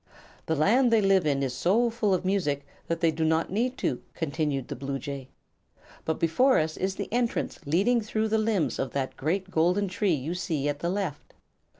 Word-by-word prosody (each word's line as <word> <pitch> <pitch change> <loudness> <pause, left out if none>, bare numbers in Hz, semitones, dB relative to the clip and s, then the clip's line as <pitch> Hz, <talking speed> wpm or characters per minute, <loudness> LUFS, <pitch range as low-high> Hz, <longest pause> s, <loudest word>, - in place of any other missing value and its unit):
"The 160 - +1
land 235 - +4
they 225 - +5
live 195 -4 +3
in 140 -1 +1
is 130 -2 -1
so 220 - +2
full 220 -3 0
of 185 0 +1
music 150 -8 0 0.2
that 165 0 -2
they 165 -1 +4
do 160 +1 -2
not 160 +1 +1
need 245 +6 0
to," 125 - -1
continued 150 -4 -2
the - - -5
bluejay. 135 0 -5 0.8
"But 160 - -1
before 250 +12 +3
us 155 0 0
is 190 +1 -2
the - - -4
entrance, 240 -1 -1
leading 205 +11 +3
through 220 0 -1
the 220 +1 +2
limbs 215 -6 0
of 135 - -2
that 130 -1 -2
great 185 +7 -2
golden 180 +5 +2
tree 190 -1 +1
you 150 +5 -3
see 160 -6 -2
at 145 0 -2
the 170 - -1
left. 185 -6 -4
170 Hz, 200 wpm, -27 LUFS, 145-205 Hz, 0.8 s, they